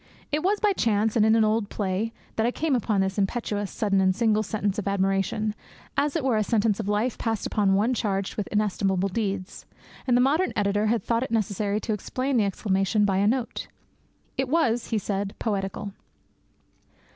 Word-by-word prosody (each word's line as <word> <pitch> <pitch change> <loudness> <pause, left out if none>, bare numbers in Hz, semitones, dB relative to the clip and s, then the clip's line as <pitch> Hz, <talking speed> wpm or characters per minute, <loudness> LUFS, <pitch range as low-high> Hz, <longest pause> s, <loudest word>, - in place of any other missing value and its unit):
It 300 +1 +1
was 400 +4 +1
by 420 -2 +3
chance, 220 - +1
and 220 - +4
in 220 +1 +5
an 225 - +4
old 215 -1 +1
play, 200 +2 -2 0.2
that 220 - +1
I - - +3
came 295 +2 0
upon 215 -4 +1
this 190 +1 -1
impetuous, 205 -1 -1
sudden, 195 -3 +1
and 185 -1 +3
single 215 -1 +2
sentence 210 -1 -2
of 200 - -4
admiration, 195 +2 0 0.4
as 285 +2 +1
it 320 - 0
were 255 -4 +2
a 215 - +2
sentence 215 -1 +1
of 215 - -3
life 210 +4 0
passed 225 -2 -1
upon 195 -2 +2
one 220 +6 +2
charged 195 -5 -1
with 210 - -3
inestimable 195 -2 0
deeds; 195 -2 -3 0.4
and 245 -1 +4
the - - +3
modern 295 +9 +2
editor 205 +1 +1
had 230 +1 +1
thought 230 0 0
it 260 - -3
necessary 210 -2 0
to 220 - -1
explain 255 +5 -2
the 215 - +3
exclamation 195 +1 +1
by 195 -2 +1
a 200 +1 +3
note. 240 +1 -1 0.7
It 265 -1 0
was, 245 -7 +1
he 225 - 0
said, 200 0 -2
poetical. 200 -2 -3
215 Hz, 190 wpm, -26 LUFS, 200-230 Hz, 0.7 s, in